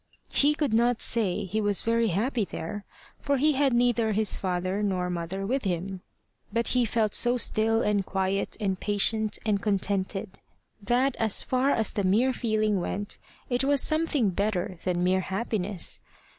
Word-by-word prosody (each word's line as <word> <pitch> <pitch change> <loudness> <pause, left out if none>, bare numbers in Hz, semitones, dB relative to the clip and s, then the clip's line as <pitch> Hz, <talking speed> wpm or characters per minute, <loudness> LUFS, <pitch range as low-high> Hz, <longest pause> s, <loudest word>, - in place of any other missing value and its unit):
He 295 +1 +4
could 295 -6 -1
not 235 +1 +2
say 210 -7 -1
he 215 +4 -2
was 205 -2 +1
very 230 0 +1
happy 220 +5 0
there, 200 +2 -6 0.3
for 280 -1 0
he 300 +4 +3
had 280 -1 +2
neither 235 -2 +2
his 215 +1 +1
father 185 +1 -2
nor 185 -3 -1
mother 180 +3 -4
with 260 +6 -1
him, 185 0 -3 0.5
but 230 +2 +1
he 250 -1 +2
felt 220 -1 0
so 245 +1 +3
still 225 -1 +2
and 205 -1 +1
quiet 190 +1 -2
and 190 -3 -1
patient 215 +1 +1
and 205 -2 +1
contented, 195 -1 -1 0.4
that, 245 +6 +1
as 220 -2 +3
far 260 +2 +1
as 225 -5 +1
the 200 - -1
mere 225 +8 +2
feeling 215 -4 0
went, 205 +3 -3 0.3
it 245 +1 0
was 280 +1 +3
something 310 -8 +1
better 185 -2 -2
than 180 -1 0
mere 185 +1 +2
happiness. 195 -1 -1
215 Hz, 165 wpm, -27 LUFS, 190-240 Hz, 0.5 s, He